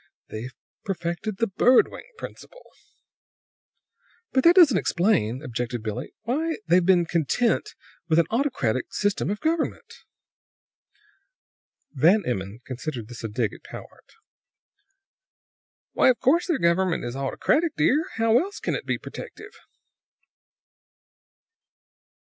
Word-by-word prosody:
They've 120 +5 -7 0.3
perfected 190 +2 -3
the 230 - +2
bird 235 +5 +4
wing - - -10
principle!" - - -11 1.7
"But 260 - +2
that 340 +1 +7
doesn't 335 - +6
explain," 160 - +1
objected 120 -3 -4
Billie, 110 -2 -5
"why 310 +8 -1
they've 175 +2 +4
been 175 -1 +4
content 220 - 0 0.3
with 160 - +3
an 170 - +5
autocratic 220 - -1
system 205 -2 -1
of 210 +1 -2
government." 320 0 -2 2.0
Van 170 +9 +4
Emmon 100 -1 -4
considered 125 -3 -6
this 120 -1 -9
a - - -2
dig 105 0 -1
at - - -12
Powart. - - -12 1.8
"Why, - - +4
of 250 - +2
course 335 +8 +2
their 335 -5 +1
government 170 - +1
is 120 +1 -5
autocratic, 285 - 0
dear! 290 - +2
How 225 +1 +3
else 395 +3 -4
can - - -2
it - - -4
be - - 0
protective?" - - -10
185 Hz, 120 wpm, -25 LUFS, -, 2.0 s, that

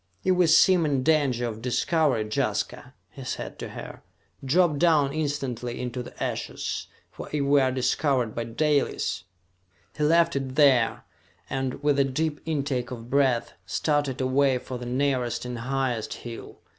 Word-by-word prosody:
"If 185 -1 +3
we 180 -1 +4
seem 175 +2 +6
in 140 -4 +1
danger 140 -6 +2
of 110 -2 -5
discovery, 130 0 +1
Jaska," 110 - -2 0.2
he - - -10
said - - -5
to - - -5
her, - - -9 0.4
"drop 150 +2 +3
down 150 -5 +3
instantly 135 -6 -3
into 125 0 -4
the - - -7
ashes, - - -3 0.2
for - - -9
if 150 -2 0
we 140 0 +4
are 130 -1 +2
discovered 130 -2 +1
by 115 - -3
Dalis...." 135 - 0 0.7
He 150 - -2
left 165 +1 +4
it 135 -1 -3
there 135 -6 +4 0.5
and, 135 +1 -3
with 145 -1 +3
a - - +6
deep 150 +3 -2
intake 140 -5 -1
of 120 -1 -8
breath, 135 -4 +2
started 145 -4 0
away 130 0 +2
for 125 0 -7
the 120 - -6
nearest 125 -2 0
and 125 -1 -5
highest 125 -2 -2
hill. 115 -1 -9
135 Hz, 155 wpm, -26 LUFS, 125-150 Hz, 0.7 s, seem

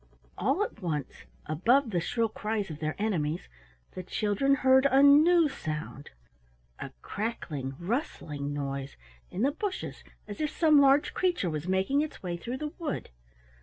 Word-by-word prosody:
All 270 - +1
at 220 - -7
once, 155 -6 -4 0.2
above 230 - +2
the 175 - +1
shrill 230 +7 0
cries 210 -3 -3
of 150 - -8
their 155 0 -2
enemies, 175 -7 -1 0.4
the 185 - -6
children 210 +9 +1
heard 265 0 +5
a 275 0 +4
new 315 +4 +6
sound, 155 - -6 0.7
a - - -5
crackling 155 - -4
rustling 170 - -3
noise 140 -1 -4 0.3
in 200 - -3
the 275 - +3
bushes 380 +5 -5 0.2
as 205 +4 -6
if 305 - 0
some 305 -3 +4
large 275 +1 +4
creature 350 - 0
was 155 +2 -4
making 190 +10 +2
its 305 -8 -5
way 175 -2 -3
through 240 +9 -5
the 300 +1 -5
wood. 315 - -4
215 Hz, 155 wpm, -29 LUFS, -, 0.7 s, new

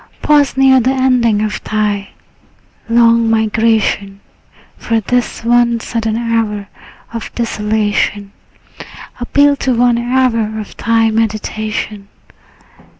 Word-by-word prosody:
Pause 290 -3 +3
near 265 -1 +5
the 250 +1 +1
ending 250 -5 +2
of 215 -1 -4
thy 210 -2 -2 0.8
long 230 0 +4
migration; 220 -2 0 0.6
For 230 -1 -1
this 245 +2 -2
one 240 0 +3
sudden 225 -1 -3
hour 225 -3 -2 0.5
of 230 - -6
desolation 210 -3 -1 0.9
Appeals 285 +3 +2
to 260 -2 0
one 240 0 +2
hour 235 -3 0
of 210 - -9
thy 225 -1 +1
meditation. 215 -2 -3
225 Hz, 100 wpm, -15 LUFS, 215-240 Hz, 0.9 s, near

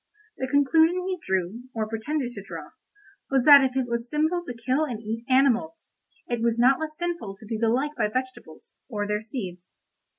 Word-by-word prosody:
The 260 - -2
conclusion 320 +5 +4
he 370 -1 -2
drew, 190 +6 -2
or 220 -1 -1
pretended 245 +4 -3
to - - -7
draw, - - -9 0.6
was 270 -2 +2
that 285 -1 +9
if 260 0 0
it 260 -2 0
was 235 0 -3
sinful 315 +4 +1
to 245 - -6
kill 260 +6 0
and 245 -8 -3
eat 225 +1 -5
animals, 275 +5 +2 0.3
it 240 -2 -3
was 230 0 +1
not 255 +3 +4
less 310 -1 -5
sinful 345 - -3
to 205 - -15
do 220 0 -4
the 225 0 +2
like 275 +6 0
by 215 -5 +1
vegetables, 255 -8 -6
or 205 -4 -2
their 210 0 -1
seeds. 190 -6 -7
245 Hz, 195 wpm, -25 LUFS, 225-290 Hz, 0.6 s, that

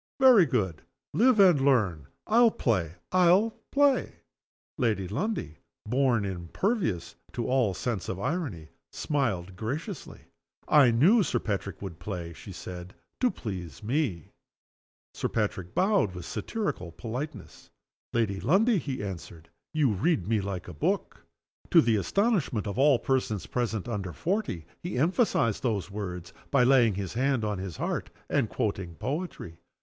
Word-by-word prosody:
Very 250 -10 +7
good. 95 - -1 0.3
Live 245 0 +4
and 180 -8 +6
learn. 100 - +2 0.2
I'll 235 +2 +5
play! 95 - 0 0.2
I'll 185 +5 +5 0.2
play!" 285 -1 +2 0.6
Lady 110 -7 +1
Lundie 110 - -3 0.3
(born 125 -2 +2
impervious 95 - -2 0.2
to 120 - -2
all 125 -7 +2
sense 115 -2 -3
of 95 - -3
irony) 110 - -3 0.2
smiled 100 - -1
graciously. 140 - -5 0.5
"I 145 -5 +6
knew 165 - +5
Sir 185 - 0
Patrick 100 -2 -3
would 85 -4 -7
play," 85 -5 -5
she 115 -1 -11
said, 90 0 -8 0.2
"to 250 - +3
please 90 - -6
me." 115 - -1 0.8
Sir - - -2
Patrick 100 -5 -2
bowed 185 - +2
with 90 -1 -7
satirical 200 - -3
politeness. 125 - -7 0.4
"Lady 105 -5 0
Lundie," 205 - +3
he 135 -8 -4
answered, 85 -4 -8 0.2
"you 150 -6 +2
read 100 - +1
me 110 -1 +1
like 95 -2 -5
a 90 - -7
book." 75 - -2 0.5
To - - +7
the 115 -2 +3
astonishment 165 - +1
of 100 +4 -3
all 140 -1 +6
persons 120 -6 -1
present 110 -5 -2
under 100 -7 -3
forty 175 - -2 0.2
he 175 -6 -4
emphasized 155 - +2
those 105 -6 -1
words 90 -4 -6 0.2
by 140 -3 +4
laying 125 -5 +5
his 95 -3 -4
hand 130 -2 +1
on 105 -3 -2
his 95 -3 -6
heart, - - -2 0.2
and - - +2
quoting 85 -3 -2
poetry. 140 - -5
115 Hz, 140 wpm, -28 LUFS, 95-155 Hz, 0.8 s, Very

